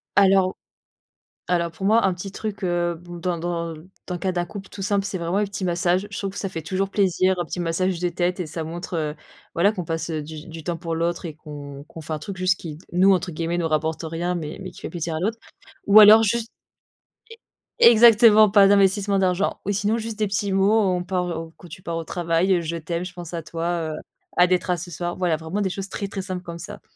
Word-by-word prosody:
Alors 195 -1 +4 0.9
alors 170 -2 0
pour 190 - -8
moi, 225 +3 +4
un 185 - +1
petit 190 +2 -7
truc, 200 0 -6
heu, 175 -1 0
b 175 +1 -10
dans 180 0 -1
dans 170 -1 -3 0.3
dans 180 - -4
le - - -4
cas 190 - -1
d'un 175 -1 -1
couple 195 +1 -9
tout 200 - -9
simple, 200 0 0
c'est 195 -2 -3
vraiment 170 +3 -1
les 210 - +2
petits 195 -1 -5
massages. 175 +2 +1
Je 200 - -8
trouve 195 - -3
que 195 - -8
ça 195 - -2
fait 165 -3 -6
toujours 190 +4 -1
plaisir, 190 -1 +2
un 175 - 0
petit 175 +3 -5
massage 175 +2 0
de 180 - +1
tête 175 +1 -1
et 170 - -2
ça 160 +1 -5
montre, 170 +3 -6
heu, 150 -2 -2 0.4
voilà 195 +5 +3
qu'on 180 -5 -5
passe, 165 +1 -3
heu, 155 -1 -2
du 155 +2 -9
du 165 -1 -9
temps 175 -2 -2
pour 165 -1 -3
l'autre 170 +2 -1
et 155 - -6
qu'on 145 -2 -9
qu'on 165 - -11
fait 160 0 -6
un 155 - -2
truc 195 +5 -7
juste 185 0 +1
qui 155 -3 -8
nous, 190 +2 +5
entre 180 -2 0
guillemets 165 +2 -2
«nous 165 -2 0
rapporte 155 +1 -1
rien» 170 +3 -2
mais 155 -3 -5
mais 185 - -6
qui - - -14
fait - - -5
plaisir 170 -2 -4
à - - -1
l'autre. 220 +5 -1 0.5
Ou 205 +2 +9
alors 215 +1 +9
juste 230 +2 0 1.3
é - - +9
exactement, 220 -2 +7
pas 200 -1 +6
d'investissement 200 0 +3
d'argent 185 +1 0
ou 200 - 0
sinon 210 +2 0
juste 225 -1 -5
des 215 - +1
petits 200 +1 -1
mots, 200 +3 +4
on 180 -3 +1
par, 180 -1 -1
heu, 165 -1 -5
quand 175 - -13
tu 175 +4 -10
pars 165 0 -3
au 165 - -3
travail, 170 +3 +1
heu, 175 - +2
«Je 165 +1 -3
t'aime», 170 +2 -3
«Je 180 - -12
pense 175 -1 -9
à 170 - -3
toi», 165 -1 -2
heu, - - -4 0.5
«Hâte 180 0 +6
d'être 180 0 +1
à 180 - +2
ce 175 +1 -8
soir», 175 +2 -3
ouais, - - -11
voilà, 175 -4 +1
vraiment 165 +6 -3
des 190 - 0
choses 195 +1 -5
très, 200 - -4
très 195 0 -5
simples 185 -1 -5
comme 170 -1 -8
ça. 205 +4 -9
180 Hz, 255 wpm, -23 LUFS, 165-195 Hz, 1.3 s, Ou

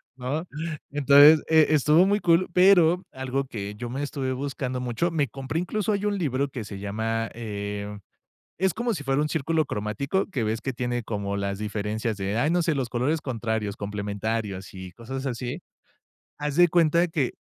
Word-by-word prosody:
¿no? 135 +6 -3 0.5
Entonces, 145 +2 +7
eh, 160 -1 +6
estuvo 155 +4 +5
muy 205 +2 +1
cool, 170 +1 +3
pero 180 -1 +5
algo 130 +1 -2
que 105 -4 -6
yo 120 +2 -6
me 135 +3 -4
estuve 135 -2 -3
buscando 130 -1 -3
mucho, 125 +8 -1
me 150 -4 +1
compré 135 +6 -4
incluso 210 +4 -1
ahí 205 0 -1
un 205 -1 0
libro 140 -5 0
que 130 -4 -6
se 100 -1 -8
llama, 110 +3 -2
eh, 105 -2 -5 0.6
es 190 +1 +1
como 235 +4 -1
si 145 - -6
fuera 135 +1 +1
un 150 - 0
círculo 160 +1 0
cromático, 135 - -2
que 130 -10 -2
ves 110 +1 -1
que 135 - -2
tiene 120 0 -2
como 100 -2 -3
las 100 0 -2
diferencias 105 +1 -2
de, 100 +2 -2
¡ay, 145 +6 +2
no 175 +1 +2
sé!, 165 -1 +1
los 135 -3 -2
colores 130 +7 0
contrarios, 110 -5 -3
complementarios, 105 0 -3
sí, 95 -1 -9
cosas 130 +6 -6
así, 125 +5 -4 0.8
haz 150 -1 -3
de 175 +1 +6
cuenta 170 +1 +3
que 150 -6 -1
130 Hz, 180 wpm, -25 LUFS, 110-160 Hz, 0.8 s, Entonces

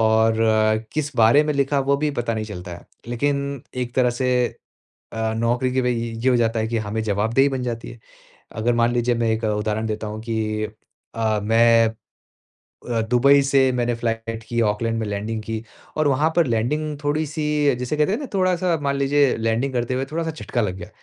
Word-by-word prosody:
और 110 0 +3 0.6
किस 150 -2 -2
बारे 115 +6 +6
में 150 - 0
लिखा 140 0 +1
वो 140 +1 +2
भी 150 +1 0
पता 120 -4 -2
नहीं 110 - -3
चलता 90 -4 -8
है। 85 - -14 0.2
लेकिन 140 +2 -1
एक 120 -1 -3
तरह 125 -2 +3
से 130 0 +2 0.8
अ, 110 0 -1
नौकरी 120 +3 0
के 130 - +2
भई 125 0 +1
य 115 -1 -4
ये 130 - +4
हो 125 - +3
जाता 115 -1 +1
है 110 - -1
कि 115 0 -1
हमें 110 +1 -2
जवाबदेही 110 +7 +2
बन 130 -2 -3
जाती 115 -2 -4
है। 120 - -12 0.6
अगर 120 +2 +1
मान 120 +1 +3
लीजिए 120 0 +1
मैं 115 -1 +1
एक 110 +1 -1
उदाहरण 105 +1 -1
देता 110 0 -3
हूँ 105 +1 -5
कि 110 -2 -2 0.5
अ, 110 -2 0
मैं 115 +1 +4 1.0
अ, 115 - +1
दुबई 140 +3 +5
से 135 -1 +3
मैंने 120 -1 0
फ़्लाइट 115 -1 -3
की, 120 0 0
ऑकलैंड 115 +1 0
में 110 - -2
लैंडिंग 105 +2 -3
की 110 0 -4 0.3
और 155 -1 +2
वहाँ 145 +4 +2
पर 170 -4 +4
लैंडिंग 145 +6 -1
थोड़ी-सी 150 0 0
अ, - - +1
जिसे 125 +4 -2
कहते 150 +6 +2
हैं 220 - 0
ना 285 - -4
थोड़ा-सा 185 -3 +1
मान 140 0 0
लीजिए 140 0 +2
लैंडिंग 115 +4 0
करते 120 0 -1
हुए 130 +1 -1
थोड़ा-सा 165 0 -1
झटका 140 -5 -3
लग 95 -3 -2
गया। 85 - -8
120 Hz, 205 wpm, -22 LUFS, 110-140 Hz, 1.0 s, बारे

